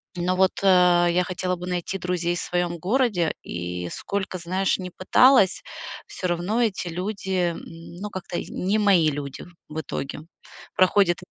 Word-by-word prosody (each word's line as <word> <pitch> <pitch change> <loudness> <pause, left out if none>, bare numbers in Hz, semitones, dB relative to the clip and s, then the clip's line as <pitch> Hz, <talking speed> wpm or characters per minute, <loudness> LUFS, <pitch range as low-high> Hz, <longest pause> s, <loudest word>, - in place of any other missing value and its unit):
Но 180 +1 0
вот, 190 0 +2
э, 180 -2 +5
я 180 +1 +2
хотела 180 0 -2
бы 180 +1 -7
найти 180 +1 -2
друзей 175 -1 -1
в - - -3
своем 175 -1 -1
городе, 195 -2 +1
и 90 0 -5
сколько, 195 -2 -3
знаешь, 185 +3 0
не 180 -1 -6
пыталась, 200 +2 +4 0.4
всё 185 - -4
равно 180 +7 0
эти 195 -5 0
люди, 190 +3 -4 0.2
м, - - -8 0.4
ну, 205 +1 -5
как-то 180 -2 -5
и - - -4
не 195 +4 0
мои 195 -7 +4
люди, 140 -2 -6 0.2
в 155 +1 -4
итоге. 140 -1 -5 0.6
Проходит 185 -1 +4
180 Hz, 160 wpm, -24 LUFS, 175-195 Hz, 0.6 s, э